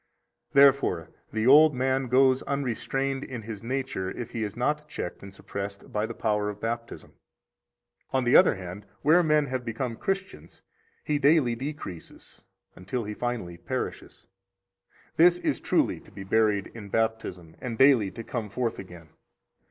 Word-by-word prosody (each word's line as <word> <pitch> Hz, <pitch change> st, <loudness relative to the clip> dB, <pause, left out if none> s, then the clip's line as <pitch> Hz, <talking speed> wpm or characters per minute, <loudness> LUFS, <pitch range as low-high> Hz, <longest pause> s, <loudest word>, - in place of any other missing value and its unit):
71 140 Hz, -, +8 dB
Therefore 130 Hz, -11 st, +2 dB, 0.2 s
the 110 Hz, 0 st, -1 dB
old 150 Hz, +3 st, +7 dB
man 130 Hz, +1 st, 0 dB
goes 130 Hz, +1 st, +4 dB
unrestrained 135 Hz, 0 st, -2 dB
in 120 Hz, -4 st, -7 dB
his 105 Hz, -2 st, -7 dB
nature 130 Hz, -6 st, -3 dB
if 120 Hz, +4 st, -6 dB
he 115 Hz, -, -4 dB
is 105 Hz, -2 st, -4 dB
not 150 Hz, +5 st, -1 dB
checked 90 Hz, -, -6 dB
and 100 Hz, -, -10 dB
suppressed 100 Hz, +1 st, -7 dB
by 105 Hz, +1 st, 0 dB
the -, -, -7 dB
power 105 Hz, -2 st, 0 dB
of 105 Hz, 0 st, -7 dB
Baptism. 115 Hz, +1 st, -5 dB, 1.0 s
On 130 Hz, -1 st, +1 dB
the 120 Hz, +1 st, +3 dB
other 180 Hz, -, +7 dB
hand, 95 Hz, +2 st, -8 dB, 0.2 s
where 160 Hz, +5 st, +6 dB
men 155 Hz, -3 st, +3 dB
have 130 Hz, -2 st, -3 dB
become 115 Hz, +1 st, -3 dB
Christians, 195 Hz, -, -5 dB, 0.4 s
he 150 Hz, -1 st, 0 dB
daily 145 Hz, -4 st, +4 dB
decreases 125 Hz, -, -8 dB, 0.3 s
until 110 Hz, +7 st, -4 dB
he 105 Hz, 0 st, -5 dB
finally 110 Hz, -7 st, -4 dB
perishes. -, -, -5 dB, 0.9 s
That 175 Hz, +2 st, +6 dB
is -, -, +1 dB
truly -, -, +1 dB
to -, -, -18 dB
be 95 Hz, -, -9 dB
buried 105 Hz, 0 st, +1 dB
in 105 Hz, -3 st, -9 dB
Baptism, 105 Hz, -7 st, -2 dB
and 120 Hz, -3 st, -4 dB
daily 130 Hz, -6 st, +5 dB
to 115 Hz, +4 st, -8 dB
come 115 Hz, -2 st, -4 dB
forth 115 Hz, +2 st, -2 dB
again. 90 Hz, -4 st, -11 dB
120 Hz, 160 wpm, -27 LUFS, 105-135 Hz, 1.0 s, 71